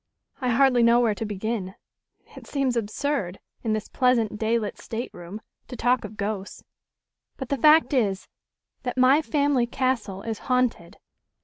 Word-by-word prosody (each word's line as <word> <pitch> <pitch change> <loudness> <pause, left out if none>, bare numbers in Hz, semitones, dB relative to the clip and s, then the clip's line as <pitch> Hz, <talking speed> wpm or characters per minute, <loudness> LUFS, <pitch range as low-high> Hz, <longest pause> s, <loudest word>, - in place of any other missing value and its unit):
"I 255 - -1
hardly 250 0 +4
know 235 +1 +5
where 230 -3 +2
to 220 - -5
begin. 205 -1 -4 0.6
It - - -12
seems 270 -3 0
absurd 220 -3 -2 0.2
in 220 - 0
this 215 0 -3
pleasant 230 -5 +1
day 225 +1 +1
lit 215 -3 -4
stateroom 215 -4 -7 0.3
to - - -8
talk 245 +1 +1
of 210 0 -9
ghosts. 200 -1 -4 0.7
But 265 -2 -6
the 280 - 0
fact 305 +3 +5
is 200 -7 0 0.5
that 250 0 -4
my 260 +4 +5
family 285 -5 +1
castle 235 -7 -2
is 225 -2 -4
haunted." 250 -9 0
235 Hz, 150 wpm, -25 LUFS, 210-255 Hz, 0.7 s, know